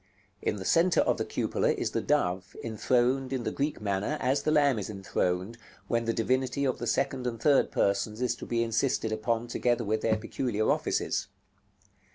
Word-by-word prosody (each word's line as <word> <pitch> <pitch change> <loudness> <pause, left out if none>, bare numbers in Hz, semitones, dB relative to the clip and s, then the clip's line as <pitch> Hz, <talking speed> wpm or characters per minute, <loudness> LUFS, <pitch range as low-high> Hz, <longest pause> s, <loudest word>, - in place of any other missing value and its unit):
In - - 0
the 95 -2 -7
centre 170 +1 +4
of - - +1
the - - -1
cupola - - 0
is - - -2
the - - -1
Dove, 90 +2 0
enthroned 125 +4 +1
in 130 -3 -2
the - - -2
Greek 145 +2 -2
manner, 105 +7 -1
as 135 +2 +1
the 155 - -1
Lamb 145 -6 +3
is 100 - -5
enthroned, 95 +1 -2 0.3
when 115 -1 0
the 115 - +1
Divinity 130 +4 0
of 130 - 0
the 120 - -3
Second 130 +1 0
and 115 -2 -3
Third 140 +3 +4
Persons 100 +2 0
is 125 -1 +1
to - - -8
be 115 -1 +1
insisted 115 0 0
upon 115 +1 -1
together 120 0 0
with 110 0 -1
their 110 -1 +2
peculiar 110 -1 -1
offices. - - -1
120 Hz, 190 wpm, -29 LUFS, 110-130 Hz, 0.3 s, centre